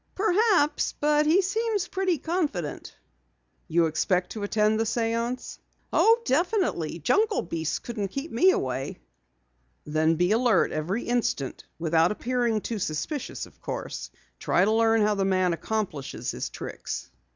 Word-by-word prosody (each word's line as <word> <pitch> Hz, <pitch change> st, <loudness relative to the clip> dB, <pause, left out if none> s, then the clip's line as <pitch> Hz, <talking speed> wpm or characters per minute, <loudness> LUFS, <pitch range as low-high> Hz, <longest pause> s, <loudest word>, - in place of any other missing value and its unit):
"Perhaps, 395 Hz, -5 st, +2 dB
but 300 Hz, 0 st, +3 dB
he 360 Hz, +5 st, +4 dB
seems 425 Hz, 0 st, -1 dB
pretty 375 Hz, -3 st, 0 dB
confident." 290 Hz, -, -3 dB, 0.7 s
"You 170 Hz, +1 st, +3 dB
expect 180 Hz, +3 st, 0 dB
to 215 Hz, -, -6 dB
attend 215 Hz, +1 st, +2 dB
the -, -, +3 dB
séance?" 230 Hz, +2 st, -2 dB, 0.3 s
"Oh, 455 Hz, +1 st, +5 dB
definitely. 335 Hz, -, 0 dB
Jungle 410 Hz, -, +2 dB
beasts 165 Hz, -2 st, -2 dB
couldn't 220 Hz, -4 st, -4 dB
keep 275 Hz, -, -5 dB
me 360 Hz, +12 st, +5 dB
away." 130 Hz, -, -1 dB, 0.9 s
"Then 155 Hz, +2 st, +2 dB
be 180 Hz, +4 st, +2 dB
alert 235 Hz, +1 st, +3 dB
every 180 Hz, +10 st, -2 dB
instant 235 Hz, -, -1 dB
without 165 Hz, +1 st, +2 dB
appearing 235 Hz, -1 st, 0 dB
too 225 Hz, 0 st, -4 dB
suspicious, 190 Hz, -, -3 dB
of -, -, -20 dB
course. -, -, -5 dB, 0.3 s
Try 180 Hz, -, +2 dB
to 215 Hz, -, +2 dB
learn 225 Hz, 0 st, +3 dB
how 210 Hz, 0 st, +3 dB
the 200 Hz, -1 st, 0 dB
man 185 Hz, -2 st, +2 dB
accomplishes 180 Hz, -6 st, -3 dB
his -, -, -4 dB
tricks." -, -, -6 dB
225 Hz, 140 wpm, -26 LUFS, -, 0.9 s, Oh